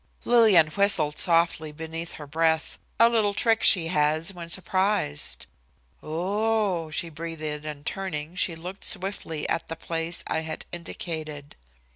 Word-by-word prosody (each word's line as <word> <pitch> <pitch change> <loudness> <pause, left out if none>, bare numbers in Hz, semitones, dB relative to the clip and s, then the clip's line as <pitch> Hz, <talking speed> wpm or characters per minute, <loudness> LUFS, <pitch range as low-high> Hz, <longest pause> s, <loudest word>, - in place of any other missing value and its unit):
Lillian 220 -9 +6
whistled 165 -5 +2
softly 165 -3 +4
beneath 165 +2 -6
her 150 - -9
breath, 160 +2 0 0.2
a 230 - +8
little 215 -4 +1
trick 225 0 +2
she 165 -5 +5
has 155 +2 +1
when 170 -2 -9
surprised. 190 - -1 0.6
"Oh 195 +2 0
h 155 - -8
h!" - - +2
she 170 - -8
breathed, 165 0 -7 0.2
and 145 -1 -7
turning, 170 -5 -4
she 180 -2 +1
looked 180 +5 -8
swiftly 185 -5 -2
at - - -2
the 165 - -5
place 165 +1 -3
I - - -1
had 160 0 -6
indicated. 155 -4 -6
165 Hz, 145 wpm, -26 LUFS, 155-195 Hz, 0.6 s, a